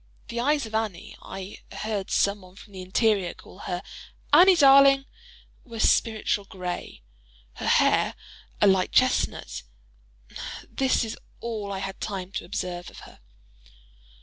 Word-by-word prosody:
The 235 - -3
eyes 285 +2 +1
of 220 - -10
Annie 220 -6 -3
(I 190 +1 -8
heard 210 -3 -4
some 200 0 +1
one 185 0 -16
from 205 0 -15
the 190 - -7
interior 195 0 +1
call 185 - -15
her 180 0 -3 0.5
"Annie, 365 +5 +8
darling!") 275 -2 +7 0.6
were 230 -3 -9
"spiritual 215 -2 +2
grey;" 180 - -6 0.5
her - - -4
hair, - - +3 0.4
a - - +4
light 190 -2 +3
chestnut: 255 0 +1 1.1
this 265 -3 +1
is 220 - -7 0.2
all 215 -4 -4
I 195 - -3
had 195 0 -6
time 190 -3 -4
to 190 - -5
observe 175 -1 -4
of - - -13
her. - - -15
205 Hz, 140 wpm, -26 LUFS, 190-235 Hz, 1.1 s, Annie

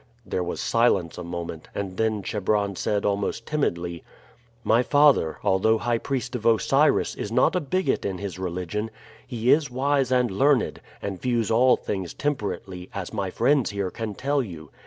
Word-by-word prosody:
There - - -2
was - - -4
silence 85 0 +1
a - - -5
moment, 85 -2 -6
and 95 -2 -4
then 110 -2 0
Chebron 100 0 0
said 100 +2 -1
almost 100 +3 -1
timidly: 85 - -2 0.6
"My 115 +2 +4
father, 145 - +4
although 110 +4 +3
high 120 +1 0
priest 130 -1 -3
of 120 - -4
Osiris, 115 -3 +3
is - - -5
not - - +3
a - - +3
bigot 185 +6 0
in 95 -2 -2
his 95 -2 -6
religion. 90 +4 -3 0.4
He 120 -1 +1
is 145 -2 +3
wise 135 +1 +1
and 125 -3 +2
learned, 135 +6 +2 0.2
and 95 -2 -4
views 120 -3 0
all 125 +3 +5
things 95 -4 -4
temperately, 100 -9 -3
as 100 0 -5
my 100 -3 -2
friends 130 +6 +2
here 100 -2 -3
can 110 0 -5
tell 140 +4 0
you. 85 -10 -8
110 Hz, 170 wpm, -25 LUFS, 95-125 Hz, 0.6 s, all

